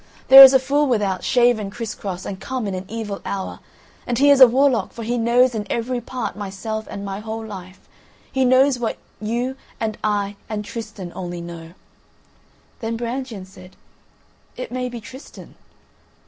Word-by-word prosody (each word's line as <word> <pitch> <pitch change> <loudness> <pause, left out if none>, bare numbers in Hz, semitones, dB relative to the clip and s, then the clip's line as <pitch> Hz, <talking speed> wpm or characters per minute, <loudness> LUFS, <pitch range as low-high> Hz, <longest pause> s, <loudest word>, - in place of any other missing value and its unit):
There 270 +1 +12
is 265 -1 +12
a 265 - +6
fool 285 +3 +1
without, 205 -7 0
shaven 240 -5 +2
criss 220 +1 -5
cross, 185 -2 -6
and 190 - -6
come 260 -3 -4
in 195 - -3
an 185 +1 -5
evil 215 -2 -5
hour, 195 -1 -5 0.5
and 240 - -1
he 285 +2 +5
is 275 -2 +8
warlock, 260 0 +3
for 230 - -7
he 235 +2 -1
knows 240 +2 +3
in 210 -2 -4
every 240 +1 -2
part 245 0 -5
myself 210 +2 -5
and 200 - -6
my 195 0 -5
whole 220 +1 -6
life; 185 -3 -10 0.4
he 265 - +1
knows 255 +1 +4
what 235 -2 -2 0.2
you 240 +4 -2 0.2
and 220 -2 -3
I 205 -1 -1
and 210 -1 -4
Tristan 205 -5 -7
only 175 -1 -5
know." 170 -1 -9 1.1
Then 225 -1 -3
Brangien 235 -4 -5
said: 185 -1 -15 0.8
"It 255 - -6
may 250 0 -3
be 240 -1 -7
Tristan." 260 +5 -12
225 Hz, 170 wpm, -21 LUFS, 200-250 Hz, 1.1 s, There